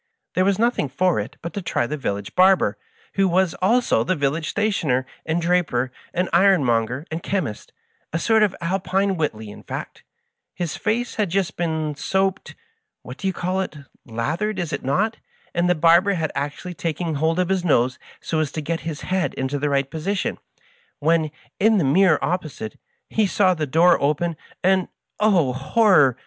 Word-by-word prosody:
There 185 - +2
was 195 -1 +2
nothing 230 - +1
for 175 +2 +1
it 100 - -6
but 170 - -5
to 200 - -3
try 170 -8 0
the 150 - -3
village 100 -8 -4
barber, 190 +1 +4 0.4
who 195 -1 +2
was 185 -1 +2
also 225 - +3
the 185 - 0
village 150 +2 -1
stationer, 155 -12 0 0.2
and 160 +1 +1
draper, 165 -8 +1 0.2
and 180 +1 0
iron 190 -2 +5
monger, 120 +4 0
and 160 +1 -3
chemist 165 - -3 0.2
— - - -43
a 165 - -1
sort 220 +5 +3
of 210 -3 +2
Alpine 190 +2 0
Whiteley, 110 - -3
in - - -11
fact. - - -7 0.5
His 175 -3 -3
face 240 +2 -2
had 210 -4 +1
just 190 +1 -1
been 160 -3 -1
soaped 190 +6 -1 0.3
— 435 - -52
^what 125 +2 -8
do 195 - -3
you 190 - 0
call 185 +2 -1
it 180 -4 -5
i - - -10
— - - -36
lathered, 160 - -2
is 175 -3 -3
it - - -3
not! 200 - 0 0.4
and 175 +1 +1
the 180 - +4
barber 170 +5 +5
had 160 -4 -1
actually 145 +6 -4
taken 165 0 -3
hold 160 +3 +1
of 185 -1 +1
his 190 -2 +1
nose 130 -6 +2 0.2
so 160 - -2
as 155 -3 -1
to - - -3
get 165 +2 -2
his 160 -2 -5
head 185 -1 -1
into 135 +2 -2
the 145 +1 0
right 140 -1 0
po 160 - -5
sition, 195 +4 -2 0.6
when, 160 +1 +2 0.3
in 220 +2 +4
the 180 - +2
mirror 175 +7 +4
opposite, 155 -11 -3 0.3
he 215 -2 +1
saw 190 -1 +3
the 155 -3 -3
door 170 +5 +4
open, 155 +4 0 0.3
and— 185 0 +3 0.3
oh, 185 -11 +3
horror 140 - +4
170 Hz, 190 wpm, -22 LUFS, 145-190 Hz, 0.6 s, iron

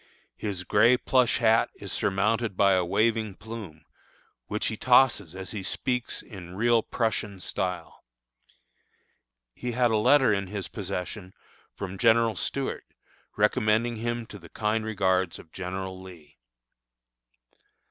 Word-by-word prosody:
His 100 -4 -4
gray 115 +6 +4
plush 125 -1 +2
hat 115 -2 +3
is - - -8
surmounted 105 +1 0
by 100 -1 +5
a 90 -1 +3
waving 110 +2 +1
plume, 105 -9 -9 0.6
which 105 - -2
he 110 - -1
tosses 120 -8 +3
as 95 0 -7
he 105 - -4
speaks 125 +5 -2
in 90 -5 -10
real 115 +2 +3
Prussian 105 -4 -2
style. 90 -2 -4 1.5
He 125 - -5
had 120 -1 +2
a 110 - +3
letter 130 +1 +5
in 100 -1 -1
his 100 0 -5
possession 95 0 -5 0.4
from 95 0 -6
General 115 -1 +4
Stuart, 140 -1 -3 0.5
recommending 110 +2 +2
him 120 +1 -3
to 105 - -11
the - - -14
kind 110 +1 -1
regards 95 -4 0
of 80 - -15
General 95 0 -5
Lee. 85 -6 -14
105 Hz, 130 wpm, -27 LUFS, 95-115 Hz, 1.5 s, by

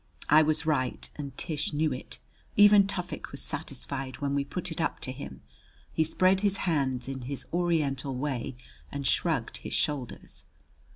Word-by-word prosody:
I 155 +1 +8
was 155 0 +2
right 130 -5 0
and 140 -3 -6
Tish 155 -3 -2
knew 150 -1 +2
it. 125 - -6 0.4
Even 205 -1 +8
Tufik 180 -3 -4
was - - -3
satisfied 130 -1 -4
when 140 -2 -1
we 140 0 +2
put 180 +5 -4
it 160 - -3
up - - 0
to 130 - -2
him. 70 - -8 0.5
He 160 - +3
spread 185 +4 +3
his 200 -1 +2
hands 135 -7 +1
in 135 -1 -4
his 140 - -4
Oriental 150 -7 +1
way 130 -1 -2 0.4
and 140 -1 -4
shrugged - - +1
his - - -6
shoulders. 140 -5 -2
145 Hz, 165 wpm, -29 LUFS, 135-165 Hz, 0.5 s, I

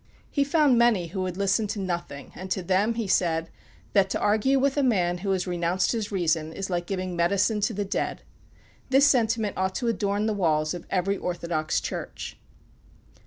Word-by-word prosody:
'" - - -31
He 285 - +2
found 280 -4 +3
many 220 -8 +3
who 190 +2 -4
would 185 -1 -3
listen 200 +2 +1
to 205 - -4
nothing, 175 -6 -4
and 185 +1 -8
to 185 0 -1
them 195 +6 +1
he 230 -1 -2
said, 165 -3 +1 0.4
"That 195 -2 +4
to - - -1
argue 220 +6 +2
with 275 +1 +2
a 290 - +2
man 180 -9 +1
who 195 +2 -3
has 190 -2 +1
renounced 175 0 0
his 220 -3 -3
reason 165 -4 0
is 195 +1 -5
like 175 -1 -1
giving 185 -2 -3
medicine 200 +5 +2
to 220 - +1
the 205 0 -2
dead." 195 - -3 0.7
This 270 +2 +5
sentiment 225 -6 +2
ought 190 0 -1
to 240 -3 0
adorn 205 -2 0
the 220 - +1
walls 155 -5 +1
of 175 -1 -8
every 195 +1 0
orthodox 170 -4 -1
church. - - -6
195 Hz, 195 wpm, -26 LUFS, 175-220 Hz, 0.7 s, This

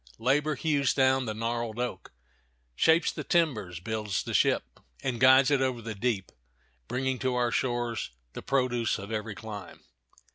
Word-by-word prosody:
Labor 145 +5 +1
hews 140 -1 +1
down 130 -1 +3
the 110 - -3
gnarled 115 0 -2
oak, 125 0 -4 0.6
shapes 160 - +4
the - - -6
timbers, 115 - 0
builds 105 +1 -2
the - - -5
ship, - - +1 0.2
and 125 -3 -2
guides 130 +2 +6
it 140 -2 +3
over 130 -2 0
the 115 -1 -5
deep, 105 -2 -2 0.6
bringing 130 0 -1
to 130 -1 0
our 120 -1 +1
shores 120 -2 -1 0.2
the - - -6
produce 125 -4 0
of 100 +1 -8
every 110 -1 -3
clime. 110 -3 -9
120 Hz, 155 wpm, -28 LUFS, 110-130 Hz, 0.6 s, guides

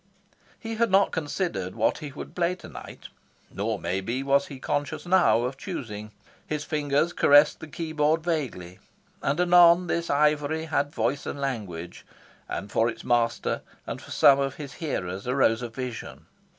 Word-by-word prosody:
He 225 -1 -5
had 230 0 +2
not 195 +1 +4
considered 150 - -3
what - - +1
he 150 -3 -7
would - - -9
play 180 0 0
tonight. - - -11 0.4
Nor, 105 +2 -1
maybe, 95 +9 -2
was 140 0 +2
he 140 - -8
conscious 145 +5 -3
now 175 -10 +4
of 130 +2 -3
choosing. 110 - -6 0.4
His 150 -1 -2
fingers 150 +2 0
caressed 145 +1 +5
the 160 - -8
keyboard 155 0 0
vaguely; 130 - -3 0.4
and 140 +4 0
anon 175 0 +6
this 170 0 -2
ivory 150 +2 +2
had 145 -2 0
voice 145 -1 -1
and 145 - -4
language; 100 -11 -5 0.5
and 100 - -5
for 115 +1 +2
its - - -7
master, 120 -1 +1 0.2
and - - -6
for - - -14
some 140 -1 +6
of 135 -1 -1
his 140 -3 -8
hearers, 95 - -3
arose 125 -3 +2
a 120 - -4
vision. 125 0 -7
145 Hz, 160 wpm, -26 LUFS, 115-160 Hz, 0.5 s, anon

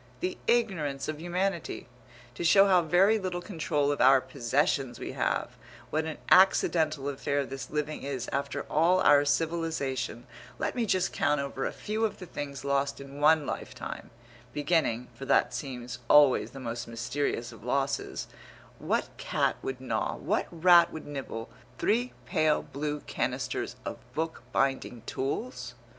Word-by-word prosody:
The 180 +5 -3
ignorance 185 -13 +1
of 155 0 -4
humanity! 175 -4 -2 0.5
To - - -5
show 195 +4 +7
how 185 -3 +5
very 190 +6 +4
little 185 -2 -3
control 155 -6 -1
of 145 - -1
our 135 +1 +7
possessions 135 +1 0
we - - -5
have - - -1 0.4
what 155 +1 0
an 160 -1 -4
accidental 160 -6 +4
affair 140 0 -1
this 135 -1 -7
living 150 0 -3
is 135 -3 -4
after 140 +1 -2
all 170 +4 +3
our 145 -3 +6
civilization 145 -7 -1 0.3
let - - -1
me 235 -3 0
just 185 -1 +1
count 150 -1 +1
over 140 -1 -2
a - - -3
few 215 +1 -3
of 220 - 0
the 185 - -8
things 140 -4 -6
lost 140 0 0
in 140 +1 -9
one 155 0 +5
lifetime, - - -6 0.4
beginning, 145 -6 +1
for 135 +4 -8
that 125 - +3
seems 125 -2 -5
always 145 -3 +6
the 135 - -10
most 120 -2 -5
mysterious 115 +1 -2
of 115 -2 -14
losses 135 +3 -1 0.5
what - - 0
cat - - 0
would 130 -1 -4
gnaw, 130 - -2
what - - -1
rat 170 0 +6
would 160 - -7
nibble 135 -6 -6 0.3
three 240 +4 +1
pale 155 -1 +2
blue 145 +1 -4
canisters - - -2
of - - -4 0.2
book 160 +1 -2
binding 135 -4 0
tools? 135 - -4
145 Hz, 150 wpm, -29 LUFS, 135-170 Hz, 0.5 s, show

